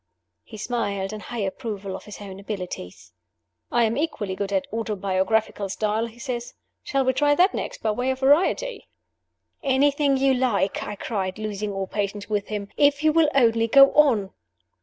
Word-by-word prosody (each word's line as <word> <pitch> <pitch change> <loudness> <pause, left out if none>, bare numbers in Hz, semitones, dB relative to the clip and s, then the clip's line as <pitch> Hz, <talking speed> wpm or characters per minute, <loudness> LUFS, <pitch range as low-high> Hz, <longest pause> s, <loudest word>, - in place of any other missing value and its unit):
He 220 - -11
smiled 205 -4 -2
in 215 - -5
high 235 +2 -5
approval 200 -2 -5
of - - -9
his 210 - -10
own 195 -2 -9
abilities. 175 - -7 0.6
"I 240 - +3
am 225 0 +1
equally 235 -11 -2
good 200 +1 -3
at 195 -1 +1
the - - -5
autobiographical 200 -1 -1
style," 215 +3 -1
he 230 +1 -15
said. 240 0 -3 0.4
"Shall 275 -1 0
we 260 - +2
try 290 +2 +3
that 365 +5 +4
next, - - -5
by 220 - +2
way 245 +4 -1
of 260 0 -2
variety?" 345 - +2 0.7
"Anything 280 +1 +2
you 270 0 +3
like," 245 -6 0
I 210 - -5
cried, 195 -3 -3
losing 210 -1 -3
all 195 -1 -3
patience 205 +1 -3
with 205 -1 -1
him, 205 -2 -4
"if 285 0 +3
you 310 -1 +4
will 325 -2 +4
only 230 -3 +4
go 275 +4 +7
on!" 235 -10 +4
220 Hz, 180 wpm, -24 LUFS, 200-265 Hz, 0.7 s, go